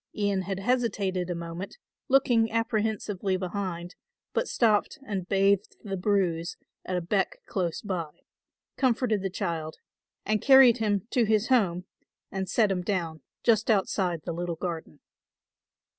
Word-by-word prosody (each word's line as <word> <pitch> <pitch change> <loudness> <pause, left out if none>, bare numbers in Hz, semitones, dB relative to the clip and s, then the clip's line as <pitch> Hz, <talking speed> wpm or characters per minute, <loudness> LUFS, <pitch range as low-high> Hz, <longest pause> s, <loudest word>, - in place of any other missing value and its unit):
Ian 200 -2 0
had 190 +1 -3
hesitated 195 -5 0
a 175 - -1
moment, 170 - -6 0.3
looking 245 -4 +4
apprehensively 215 -4 -1
behind, 180 -2 -4 0.4
but - - 0
stopped 220 +3 +2
and 190 -5 -4
bathed 195 0 +2
the 195 -2 -3
bruise 180 -4 0 0.3
at 185 - -2
a - - -1
beck 190 +3 0
close 175 -4 -2
by, 180 -6 -3 0.7
comforted 245 -5 +1
the 195 - -2
child 165 -4 -3 0.5
and 215 0 +1
carried 265 -3 +7
him 205 -3 0
to 240 -3 +3
his 215 +2 +1
home 185 -8 +2 0.5
and 190 -1 -3
set 215 -4 +3
him 180 -2 0
down 170 -5 -2 0.2
just 225 -1 +3
outside 190 -5 +1
the 170 - -3
little 175 0 -3
garden. 165 -3 -5
195 Hz, 140 wpm, -27 LUFS, 180-220 Hz, 0.7 s, carried